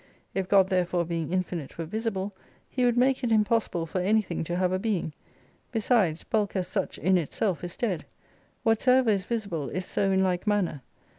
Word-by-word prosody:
If 190 Hz, -1 st, -1 dB
God 195 Hz, -2 st, +5 dB
therefore 180 Hz, -2 st, +1 dB
being 165 Hz, -2 st, -3 dB
infinite 180 Hz, -5 st, -3 dB
were 165 Hz, -, -3 dB
visible 205 Hz, +1 st, -3 dB, 0.3 s
He 250 Hz, -1 st, 0 dB
would 240 Hz, -1 st, +2 dB
make 260 Hz, +1 st, +3 dB
it 240 Hz, -, 0 dB
impossible 215 Hz, -5 st, +2 dB
for 180 Hz, +3 st, -2 dB
anything 195 Hz, -3 st, +1 dB
to 175 Hz, -, -2 dB
have 180 Hz, 0 st, +1 dB
a 185 Hz, -, 0 dB
being. 195 Hz, -7 st, -1 dB, 0.6 s
Besides, 215 Hz, -8 st, +2 dB
bulk 210 Hz, -2 st, -1 dB
as 185 Hz, -2 st, -1 dB
such 190 Hz, 0 st, -2 dB
in 185 Hz, -1 st, +3 dB
itself 175 Hz, +4 st, -1 dB
is 175 Hz, 0 st, -5 dB
dead. 190 Hz, -9 st, -2 dB, 0.6 s
"Whatsoever 250 Hz, +2 st, +4 dB
is 195 Hz, -3 st, 0 dB
visible 200 Hz, -, -2 dB
is 185 Hz, 0 st, -3 dB
so 195 Hz, -, 0 dB
in 190 Hz, 0 st, +3 dB
like 180 Hz, +1 st, 0 dB
manner. 195 Hz, -9 st, +1 dB
190 Hz, 180 wpm, -27 LUFS, 175-220 Hz, 0.6 s, God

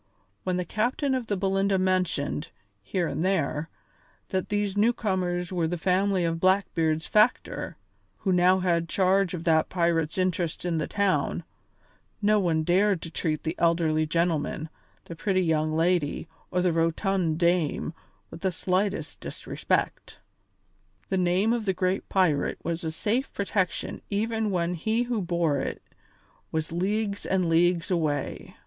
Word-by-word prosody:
When 185 Hz, -1 st, 0 dB
the 180 Hz, -, -1 dB
captain 250 Hz, -, 0 dB
of 255 Hz, -3 st, -2 dB
the 205 Hz, -, -1 dB
Belinda 195 Hz, +1 st, +1 dB
mentioned, 185 Hz, -5 st, 0 dB, 0.3 s
here 170 Hz, -, -1 dB
and 150 Hz, +2 st, -2 dB
there, 160 Hz, -4 st, 0 dB, 0.6 s
that 185 Hz, -1 st, -2 dB
these 205 Hz, -1 st, 0 dB
newcomers 190 Hz, -5 st, 0 dB
were 170 Hz, -3 st, +1 dB
the 175 Hz, +2 st, -2 dB
family 185 Hz, +1 st, +1 dB
of 165 Hz, 0 st, -1 dB
Blackbeard's 165 Hz, -4 st, +2 dB
factor, 215 Hz, +3 st, +1 dB, 0.4 s
who 190 Hz, -, -1 dB
now 185 Hz, +1 st, +4 dB
had 170 Hz, -2 st, +1 dB
charge 190 Hz, -1 st, +2 dB
of 165 Hz, -, -6 dB
that 160 Hz, -2 st, +3 dB
pirate's 170 Hz, -3 st, 0 dB
interests 180 Hz, -2 st, -1 dB
in 170 Hz, -2 st, 0 dB
the 155 Hz, -, -2 dB
town, 200 Hz, -2 st, 0 dB, 0.8 s
no 210 Hz, 0 st, +3 dB
one 165 Hz, -4 st, +1 dB
dared 190 Hz, +3 st, +3 dB
to 165 Hz, -, -7 dB
treat 155 Hz, -3 st, -2 dB
the 160 Hz, -, -1 dB
elderly 165 Hz, -2 st, +2 dB
gentleman, 160 Hz, -1 st, 0 dB, 0.4 s
the 170 Hz, -, -8 dB
pretty 190 Hz, +2 st, +1 dB
young 155 Hz, -2 st, +1 dB
lady, 165 Hz, -2 st, +1 dB, 0.2 s
or 180 Hz, 0 st, 0 dB
the 180 Hz, -2 st, +2 dB
rotund 165 Hz, 0 st, +1 dB
dame 170 Hz, -2 st, +1 dB, 0.4 s
with -, -, -9 dB
the 190 Hz, -, +1 dB
slightest 190 Hz, +3 st, -1 dB
disrespect. -, -, -3 dB, 0.9 s
The 190 Hz, -, +1 dB
name 185 Hz, +5 st, +2 dB
of 235 Hz, -3 st, -2 dB
the 190 Hz, -, +2 dB
great 185 Hz, +1 st, -1 dB
pirate 180 Hz, -7 st, +2 dB
was 170 Hz, 0 st, -3 dB
a 160 Hz, -, -1 dB
safe 215 Hz, +11 st, -1 dB
protection 195 Hz, -2 st, -2 dB
even 220 Hz, +1 st, 0 dB
when 175 Hz, -2 st, 0 dB
he 220 Hz, +7 st, 0 dB
who 240 Hz, -3 st, -1 dB
bore 170 Hz, -5 st, +1 dB
it -, -, -4 dB, 0.7 s
was 160 Hz, -1 st, -2 dB
leagues 200 Hz, +4 st, -1 dB
and 185 Hz, -2 st, +1 dB
leagues 170 Hz, +2 st, +2 dB
away. 150 Hz, -5 st, -2 dB
180 Hz, 150 wpm, -27 LUFS, 165-195 Hz, 0.9 s, now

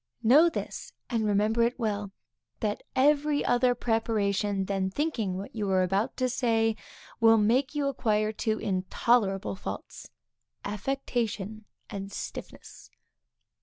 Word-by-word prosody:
Know 290 Hz, +9 st, +7 dB
this, -, -, -6 dB, 0.2 s
and 225 Hz, -2 st, +1 dB
remember 210 Hz, +3 st, +2 dB
it 235 Hz, +1 st, +2 dB
well, 210 Hz, -4 st, -2 dB, 0.5 s
that 210 Hz, -1 st, -1 dB
every 290 Hz, +2 st, +3 dB
other 245 Hz, 0 st, +3 dB
preparation 205 Hz, -4 st, 0 dB
than 190 Hz, -1 st, -1 dB
thinking 220 Hz, -, -1 dB
what 195 Hz, -, -7 dB
you 210 Hz, -3 st, -2 dB
are 185 Hz, -1 st, +3 dB
about 195 Hz, +7 st, 0 dB
to 255 Hz, -, +1 dB
say, 225 Hz, -3 st, +1 dB, 0.4 s
will 225 Hz, 0 st, +6 dB
make 255 Hz, +7 st, +2 dB
you 290 Hz, -1 st, 0 dB
acquire 215 Hz, -5 st, +1 dB
two 220 Hz, 0 st, -1 dB
intolerable 195 Hz, +1 st, +1 dB
faults, 190 Hz, -, -7 dB, 0.6 s
affectation 220 Hz, -2 st, -3 dB, 0.2 s
and 195 Hz, 0 st, -6 dB
stiffness. -, -, -8 dB
220 Hz, 125 wpm, -28 LUFS, 200-245 Hz, 0.6 s, Know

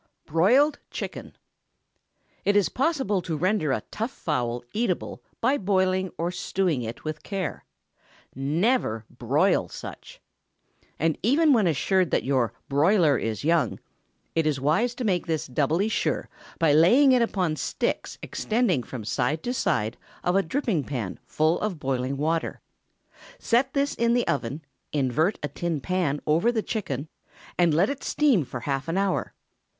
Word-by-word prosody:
BROILED 245 Hz, -, +3 dB
CHICKEN. -, -, -6 dB, 1.1 s
It 205 Hz, -, +2 dB
is 205 Hz, -2 st, +4 dB
possible 265 Hz, -, 0 dB
to 165 Hz, -2 st, -3 dB
render 180 Hz, -3 st, +1 dB
a -, -, -1 dB
tough 225 Hz, +3 st, -2 dB
fowl 120 Hz, -, -2 dB
eatable 210 Hz, -5 st, -2 dB, 0.2 s
by 265 Hz, +5 st, +2 dB
boiling 185 Hz, -1 st, +1 dB
or 170 Hz, +1 st, -1 dB
stewing 180 Hz, -6 st, -1 dB
it 115 Hz, 0 st, -6 dB
with 155 Hz, -1 st, -4 dB
care. 195 Hz, -5 st, -4 dB, 0.7 s
Never 145 Hz, -, 0 dB
broil -, -, +1 dB
such! -, -, -9 dB, 0.8 s
And 160 Hz, 0 st, 0 dB
even 290 Hz, +7 st, +4 dB
when 215 Hz, -7 st, +3 dB
assured 180 Hz, +3 st, +2 dB
that -, -, +1 dB
your 130 Hz, -5 st, +1 dB, 0.2 s
"broiler" 155 Hz, +2 st, +4 dB
is 115 Hz, -1 st, -2 dB
young, 155 Hz, -6 st, +1 dB, 0.5 s
it 160 Hz, -1 st, +1 dB
is 145 Hz, -3 st, 0 dB
wise 175 Hz, -, +1 dB
to 250 Hz, -, -4 dB
make 185 Hz, -6 st, 0 dB
this 160 Hz, -2 st, -1 dB
doubly 150 Hz, -, +1 dB
sure 220 Hz, -, -1 dB, 0.3 s
by 160 Hz, -4 st, +3 dB
laying 235 Hz, -, +6 dB
it 250 Hz, -1 st, +4 dB
upon 185 Hz, -8 st, 0 dB
sticks -, -, -2 dB
extending 215 Hz, -, 0 dB
from 120 Hz, -2 st, -7 dB
side 130 Hz, +7 st, -1 dB
to 245 Hz, -, -1 dB
side 135 Hz, -, 0 dB, 0.3 s
of 180 Hz, -, +1 dB
a 195 Hz, -, +5 dB
dripping 195 Hz, -, -1 dB
pan 120 Hz, -9 st, -4 dB
full 155 Hz, +2 st, +1 dB
of 205 Hz, -7 st, -2 dB
boiling 130 Hz, 0 st, -1 dB
water. 160 Hz, +3 st, -1 dB, 0.8 s
Set 260 Hz, -, +1 dB
this 280 Hz, +1 st, +1 dB
in 235 Hz, 0 st, +2 dB
the 245 Hz, -, +1 dB
oven, 140 Hz, +3 st, -2 dB, 0.3 s
invert 150 Hz, -, +1 dB
a -, -, 0 dB
tin 165 Hz, +2 st, -3 dB
pan 170 Hz, -3 st, -1 dB
over 165 Hz, +10 st, +3 dB
the 220 Hz, -3 st, -1 dB
chicken, 150 Hz, -, -3 dB, 0.5 s
and 175 Hz, -2 st, +3 dB
let 175 Hz, +5 st, +4 dB
it 280 Hz, +2 st, -4 dB
steam 275 Hz, -, +3 dB
for 130 Hz, -2 st, -7 dB
half 135 Hz, +3 st, -2 dB
an 165 Hz, +3 st, -1 dB
hour. 195 Hz, -1 st, 0 dB
170 Hz, 155 wpm, -26 LUFS, 145-215 Hz, 1.1 s, laying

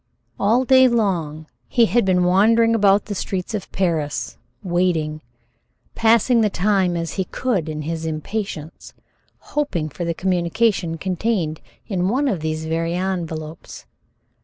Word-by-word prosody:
All 230 Hz, +6 st, +3 dB
day 260 Hz, 0 st, +6 dB
long 175 Hz, -10 st, -1 dB, 0.2 s
he 235 Hz, -, +4 dB
had 225 Hz, +3 st, +2 dB
been 180 Hz, -1 st, +3 dB
wandering 225 Hz, +6 st, +4 dB
about 205 Hz, -2 st, +3 dB
the 210 Hz, -, -4 dB
streets 190 Hz, +1 st, -4 dB
of 205 Hz, -4 st, -5 dB
Paris, 160 Hz, -6 st, -1 dB, 0.3 s
waiting 170 Hz, -4 st, 0 dB, 0.7 s
passing 230 Hz, +1 st, +3 dB
the 215 Hz, -, +3 dB
time 190 Hz, -2 st, +1 dB
as 165 Hz, -1 st, -3 dB
he 190 Hz, -, -2 dB
could 195 Hz, -11 st, -2 dB
in 155 Hz, 0 st, -4 dB
his 160 Hz, +1 st, -3 dB
impatience 160 Hz, 0 st, -5 dB, 0.6 s
hoping 180 Hz, -, -1 dB
for 175 Hz, -, -6 dB
the 170 Hz, -1 st, -2 dB
communication 180 Hz, 0 st, 0 dB
contained 180 Hz, -3 st, -2 dB, 0.2 s
in 185 Hz, -3 st, -1 dB
one 270 Hz, +6 st, +1 dB
of 200 Hz, -10 st, 0 dB
these 155 Hz, 0 st, -3 dB
very 165 Hz, +1 st, -1 dB
envelopes. 165 Hz, -4 st, -5 dB
185 Hz, 135 wpm, -21 LUFS, 165-215 Hz, 0.7 s, day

